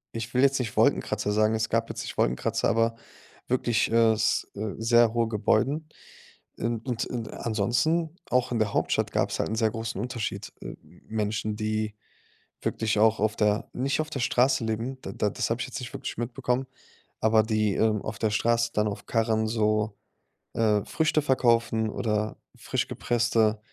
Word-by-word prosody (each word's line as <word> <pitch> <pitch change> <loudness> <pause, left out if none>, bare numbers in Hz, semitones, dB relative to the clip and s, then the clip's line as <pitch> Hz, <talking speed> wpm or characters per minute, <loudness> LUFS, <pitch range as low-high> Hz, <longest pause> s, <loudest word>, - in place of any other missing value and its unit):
ich 115 0 -5
will 125 - +3
jetzt 135 0 +4
nicht 115 -5 -4
Wolkenkratzer 105 - +2
sagen, 110 +1 +3
es 110 0 -1
gab 115 0 0
jetzt - - -5
nicht - - -7
Wolkenkratzer, 60 +1 +1
aber 115 +1 +2 0.5
wirklich, 120 -3 +1
äh, 115 -1 +5
s 110 0 +1
äh, 105 +1 -4
sehr 115 0 +4
hohe 115 -1 +1
Gebäuden. 135 +8 +1 0.7
In 115 +1 -1
und 120 -1 -2
in 115 -3 -5
ansonsten, 125 - 0
auch 125 -1 +2
in 120 - 0
der 110 -2 0
Hauptstadt - - 0
gab's - - 0
halt - - 0
'n 110 - -1
sehr 110 -1 +2
großen 115 0 -4
Unterschied. 120 -3 -4
Äh, - - -6 0.3
Menschen, 105 -1 -2
die 110 0 -2 0.7
wirklich 110 -1 0
auch 110 0 +4
auf 110 0 +1
der 105 0 +1
nicht 135 +4 0
auf 155 0 -3
der 140 - -3
Straße 125 +1 +2
leben, 115 +4 -3
da - - -6
da 105 - 0
das - - -2
habe 115 +2 0
ich - - -2
jetzt 130 - -6
nicht 125 - -7
wirklich - - -5
mitbekommen, 125 +2 -1 0.5
aber 110 0 +4
die, 110 -2 +1
ähm, 110 -1 +1
auf 110 - -5
der 110 -2 +1
Straße 115 +2 +2
dann 105 0 +2
auf 100 - -6
Karren 110 -1 +1
so, 110 -1 +1 0.6
äh, 105 -3 +2
Früchte 155 -1 +1
verkaufen 115 -5 +2
oder 105 -1 -1 0.2
frisch - - -2
gepresste 115 -2 +1
115 Hz, 175 wpm, -27 LUFS, 110-120 Hz, 0.7 s, äh